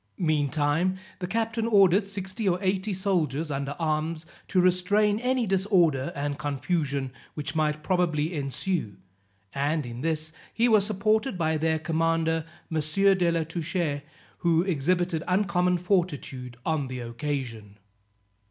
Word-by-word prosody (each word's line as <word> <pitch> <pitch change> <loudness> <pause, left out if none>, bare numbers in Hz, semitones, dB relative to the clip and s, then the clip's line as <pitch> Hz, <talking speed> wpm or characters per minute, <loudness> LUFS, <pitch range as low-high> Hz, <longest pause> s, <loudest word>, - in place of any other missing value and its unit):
Meantime 155 +3 +1 0.2
the 180 - -3
captain 225 +2 -1
ordered 195 -2 +5
sixty 195 +1 -2
or 175 - +2
eighty 190 +2 0
soldiers 165 -6 0
under 140 +1 -3
arms, 160 0 -1 0.2
to 185 - +2
restrain 200 +4 +3
any 250 0 +1
disorder 180 -8 +2
and 145 0 -3
confusion 140 -1 -1 0.2
which 150 +1 -4
might 155 -1 0
probably 170 -3 +1
ensue; 140 - -2 0.6
and 145 +2 0
in 120 0 -7
this 155 0 -1 0.2
he 235 +2 +3
was 215 -4 +5
supported 215 +2 +1
by 160 -2 +1
their 160 +1 +1
commander, 165 0 0 0.3
M. 160 - +1
de 185 +3 +3
la 165 -1 +1
Touche, 165 -2 -2 0.4
who 170 -1 +3
exhibited 175 0 0
uncommon 180 -2 +2
fortitude 150 - -1
on 155 -4 0
the 130 0 -5
occasion. 120 -4 -4
165 Hz, 130 wpm, -27 LUFS, 145-185 Hz, 0.6 s, ordered